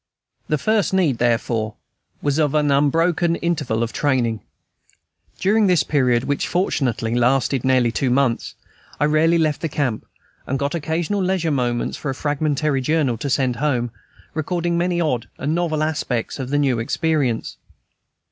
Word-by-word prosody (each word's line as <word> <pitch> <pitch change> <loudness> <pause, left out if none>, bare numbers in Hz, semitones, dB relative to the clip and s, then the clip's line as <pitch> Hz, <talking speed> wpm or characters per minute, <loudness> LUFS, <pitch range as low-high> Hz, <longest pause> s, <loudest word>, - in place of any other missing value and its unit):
The 150 - +1
first 215 +3 +1
need, 155 -11 +2
therefore, 115 -2 0 0.5
was 145 +1 +1
of 150 -1 +1
an 150 -1 +2
unbroken 165 +4 +2
interval 145 -10 -1
of 115 - -4
training. 120 -6 0 1.0
During 210 +2 +3
this 175 -5 +3
period, 125 -5 +2
which 145 0 -1
fortunately 130 - 0
lasted 125 +1 +2
nearly 130 -3 +3
two 130 +3 0
months, 125 -2 0 0.4
I 145 - +3
rarely 155 +3 +3
left 155 -3 0
the 165 - -2
camp, 130 -7 -2 0.4
and 135 - -1
got 140 +1 -2
occasional 170 +5 -1
leisure 185 -3 0
moments 120 -4 -1
for 145 - -4
a 135 - -2
fragmentary 145 -1 0
journal, 145 -3 +1
to 140 - -3
send 130 -3 +1
home, 125 -4 0 0.4
recording 170 +2 -1
the 170 - +1
many 175 0 0
odd 125 -9 -1
or - - -6
novel 155 0 0
aspects 145 -6 -2
of 130 -1 -4
the 145 - +1
new 135 -5 +1
experience. 135 -1 -1
145 Hz, 155 wpm, -21 LUFS, 125-160 Hz, 1.0 s, During